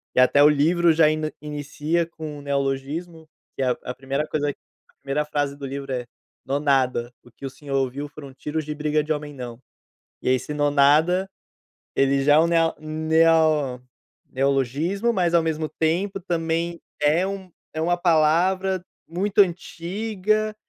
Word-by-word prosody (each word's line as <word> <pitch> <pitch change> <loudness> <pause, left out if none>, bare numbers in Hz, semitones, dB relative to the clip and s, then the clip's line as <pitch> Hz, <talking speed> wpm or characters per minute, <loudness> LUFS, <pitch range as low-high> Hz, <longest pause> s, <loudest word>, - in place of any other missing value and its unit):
e - - +4
até 135 +3 +6
o 150 - +8
livro 165 +4 +3
já 155 -1 +5
ene 155 0 -1
inicia 150 +3 -2
com 155 -3 -8
o - - -10
neologismo, 140 +4 -3 0.3
que 135 - -2
é - - +1
a - - -2
a 125 - -4
1ª 135 +3 -3
coisa, 145 -1 -1
a - - -25
1ª 140 +2 -1
frase 145 -1 -2
do 140 - -7
livro 135 0 -5
é: 125 -2 -2 0.4
"Nonada, 135 -4 +1
o 120 - -18
que 135 - -10
o - - -3
senhor 140 +1 -6
ouviu 135 +2 -2
foram 145 -2 -11
tiros 150 +3 -4
de 150 - -4
briga 150 0 0
de 155 - 0
homem 150 -1 -6
não". 125 -3 -8 0.6
E - - -1
aí 130 - +5
esse 130 +4 -4
"nonada", 150 +6 +3 0.7
ele 135 0 +3
já 145 +1 +5
é - - +7
um 165 - +4
neo 165 -1 +2
neo 155 -3 +2 0.5
neologismo, 140 - 0
mas 175 -4 +1
ao 170 - +5
mesmo 160 -1 -1
tempo 180 +6 -1
também 170 -1 -2 0.2
é 155 +5 +3
um 195 -2 -6 0.2
é 155 - -4
uma 175 +2 +2
palavra 180 +3 +2 0.2
muito 195 +5 +1
antiga, 205 +4 0
155 Hz, 170 wpm, -23 LUFS, 140-170 Hz, 0.7 s, o